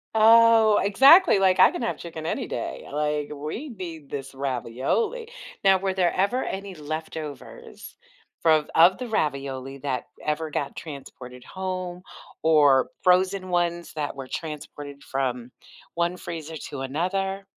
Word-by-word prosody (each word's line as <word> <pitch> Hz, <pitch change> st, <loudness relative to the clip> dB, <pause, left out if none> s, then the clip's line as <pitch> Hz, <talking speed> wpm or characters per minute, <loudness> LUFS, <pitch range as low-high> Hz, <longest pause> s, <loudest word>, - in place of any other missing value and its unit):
Oh, 225 Hz, -1 st, +6 dB
exactly, 275 Hz, -, +6 dB
like, 190 Hz, -1 st, +3 dB
"I -, -, +8 dB
can -, -, -5 dB
have 230 Hz, -, -2 dB
chicken 160 Hz, -2 st, -8 dB
any -, -, -2 dB
day," -, -, -5 dB
like, 150 Hz, 0 st, -1 dB
"We 155 Hz, -, -6 dB
need 170 Hz, -, -8 dB
this 135 Hz, -1 st, -6 dB
ravioli." 135 Hz, -, -2 dB, 0.4 s
Now, 195 Hz, -1 st, +6 dB
were 190 Hz, 0 st, -1 dB
there 180 Hz, -2 st, +1 dB
ever 200 Hz, +7 st, +1 dB
any 195 Hz, 0 st, -5 dB
leftovers 155 Hz, -1 st, -8 dB, 0.5 s
from 155 Hz, -2 st, +3 dB
of 175 Hz, +3 st, +6 dB
the 250 Hz, -2 st, -5 dB
ravioli 140 Hz, -7 st, -2 dB
that 130 Hz, -3 st, -3 dB, 0.2 s
ever 155 Hz, +1 st, -2 dB
got 140 Hz, -2 st, -3 dB
transported 130 Hz, -4 st, -10 dB
home, 185 Hz, -1 st, -5 dB, 0.4 s
or 145 Hz, -4 st, +4 dB
frozen 185 Hz, +1 st, +2 dB
ones 175 Hz, -1 st, -1 dB
that 150 Hz, -2 st, -4 dB
were 135 Hz, -1 st, -7 dB
transported 145 Hz, -2 st, -7 dB
from 125 Hz, -2 st, -3 dB, 0.4 s
one 170 Hz, +1 st, 0 dB
freezer 165 Hz, -2 st, -7 dB
to 140 Hz, -, -6 dB
another? 190 Hz, +8 st, -2 dB
160 Hz, 135 wpm, -25 LUFS, 140-190 Hz, 0.5 s, I